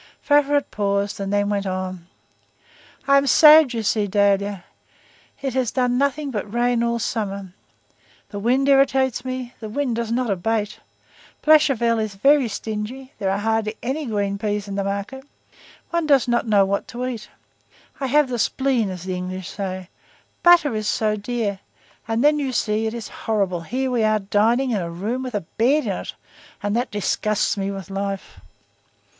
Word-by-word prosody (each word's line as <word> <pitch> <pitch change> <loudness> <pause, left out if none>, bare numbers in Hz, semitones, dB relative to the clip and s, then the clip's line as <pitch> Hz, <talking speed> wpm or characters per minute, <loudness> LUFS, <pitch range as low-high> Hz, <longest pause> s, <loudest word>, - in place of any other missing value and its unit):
Favourite 290 0 +2
paused, 200 0 -1
and 195 0 -3
then 205 0 +1
went 200 -1 -1
on:— 185 -2 -4 1.0
"I 275 0 +6
am 275 0 +2
sad, 305 0 +8
you 225 - -2
see, 210 0 +1
Dahlia. 200 -1 +1 0.8
It 270 -3 -2
has 255 -3 0
done 250 -1 0
nothing 280 +1 0
but 210 -3 -4
rain 240 0 +1
all 235 0 0
summer; 200 -5 -3 0.8
the 205 - -6
wind 255 +6 +1
irritates 265 -2 +3
me; 255 -1 -5
the 220 - -7
wind 255 +1 -1
does 230 -1 -3
not 240 -2 0
abate. 210 +2 -1 0.6
Blachevelle 270 -7 +4
is 215 -2 -3
very 275 +5 +4
stingy; 220 +5 -5
there 195 - 0
are 195 - 0
hardly 220 +1 -1
any 270 +4 -2
green 200 -2 -1
peas 205 -1 -2
in 200 - -5
the 200 0 -1
market; 200 +7 -4 0.7
one 340 -2 0
does 275 -4 +4
not 240 -1 +1
know 205 -2 +4
what 200 +1 -2
to 245 +2 -5
eat. 240 -4 -5 0.7
I 270 - -1
have 295 +2 +3
the 245 -2 -3
spleen, 255 -4 +1
as 180 -2 -7
the 185 0 -3
English 185 0 -5
say, 185 -2 -5 0.5
butter 345 -6 +5
is 215 -1 -2
so 215 -1 +1
dear! 210 -2 -3 0.5
and 225 +1 0
then 300 +1 +4
you 270 -3 -2
see 220 -1 0
it 220 - -4
is 230 -3 -6 0.2
horrible, 195 -5 0
here 255 +9 -2
we 240 -2 +1
are 215 0 +3
dining 220 +6 +1
in 210 -4 0
a 170 - -4
room 210 +9 -3
with 255 -3 -5
a 205 - 0 0.2
bed 280 +7 +3
in - - -1
it, - - -5 0.5
and 205 +1 -1
that 245 +2 0
disgusts 210 +1 0
me 195 -1 -2
with 195 -1 -7
life." 195 0 -4
220 Hz, 175 wpm, -22 LUFS, 200-260 Hz, 1.0 s, sad